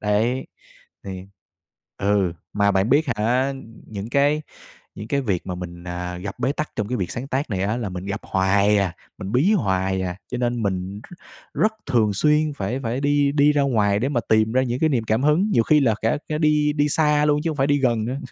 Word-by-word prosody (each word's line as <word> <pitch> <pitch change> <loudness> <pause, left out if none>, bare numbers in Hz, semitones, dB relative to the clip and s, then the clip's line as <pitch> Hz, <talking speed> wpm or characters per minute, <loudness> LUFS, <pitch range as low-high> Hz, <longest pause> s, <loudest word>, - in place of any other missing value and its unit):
Đấy. 110 +5 0 0.6
Thì 95 -1 -7 0.7
ừ, 100 -3 +1 0.2
mà 100 0 +2
bạn 95 +3 +1
biết 145 +4 +4
hả, 125 +6 +1 0.3
những 105 0 -6
cái 145 +3 +2 0.5
những 105 - -7
cái 140 +2 +1
việc 100 -9 -2
mà 90 - -3
mình, 85 -1 -8
à, 90 0 -5
gặp 100 +2 -7
bế 130 +3 0
tắc 150 +1 -4
trong 105 -2 -2
cái 125 - -1
việc 95 -5 -3
sáng 125 +3 -5
tác 135 +1 -2
này 95 -2 -1
á, 105 +4 0
là 120 -4 -3
mình 90 +1 -6
gặp 100 +1 -3
hoài 100 +2 +2
à, 95 -4 0 0.2
mình 100 0 -6
bí 145 - +3
hoài 95 - 0
à. 90 -1 -3 0.2
Cho 125 - -2
nên 120 -1 -1
mình 95 0 -3 0.5
r - - -8
rất 215 +1 +3
thường 115 -6 +2
xuyên 150 +7 +2
phải 120 +6 -3
phải 120 +2 -2
đi 145 0 +2
đi 145 0 +4
ra 145 -1 +2
ngoài 105 -7 +2
để 125 +5 0
mà 130 -4 0
tìm 110 0 +3
ra 130 +1 +3
những 125 0 -2
cái 160 - +3
niềm 125 -7 0
cảm 110 +3 0
hứng. 150 +8 +3
Nhiều 115 - +4
khi 150 +6 +4
là 120 -6 +3
cả 115 +6 +1
cả 150 - -1
đi 150 -1 +2
đi 145 0 +1
xa 150 0 +2
luôn 150 0 +2
chứ 165 - +1
không 155 - -5
phải 135 - +2
đi 145 0 +2
gần 120 -5 +1
nữa. 125 +4 -3
115 Hz, 235 wpm, -22 LUFS, 100-145 Hz, 0.7 s, biết